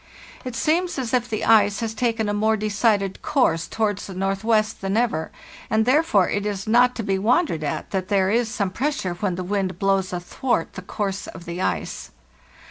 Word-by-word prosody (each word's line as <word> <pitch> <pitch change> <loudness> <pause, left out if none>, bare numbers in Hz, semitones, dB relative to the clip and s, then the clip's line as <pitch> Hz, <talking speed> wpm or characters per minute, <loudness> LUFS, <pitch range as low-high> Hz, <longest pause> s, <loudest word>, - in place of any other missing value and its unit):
It 255 -2 -6
seems 335 +7 +1
as 255 -3 -3
if 245 -1 +1
the 215 - -2
ice 205 -3 +4
has 225 -1 -2
taken 225 -2 0
a 205 - 0
more 220 +1 +2
decided 210 -2 0
course 170 - +1
towards 210 -3 -1
the 190 - -8
northwest 215 +3 0
than 195 +2 -1
ever, 220 -10 0 0.4
and 220 0 +2
therefore 255 - +3
it 205 - -1
is 205 -2 -3
not 245 +3 +4
to 225 - -3
be 195 -2 0
wondered 225 - +1
at 145 - -3
that 190 -2 -2
there 195 -2 +2
is 230 +1 +1
some 200 -3 -2
pressure 265 -7 -1
when 180 +1 -2
the 185 - -4
wind 190 -1 -2
blows 195 -1 +1
athwart 180 +3 -2
the 190 - -7
course 195 +1 -3
of 170 - -10
the 170 +2 -5
ice. 85 - -2
205 Hz, 195 wpm, -23 LUFS, 190-230 Hz, 0.4 s, ice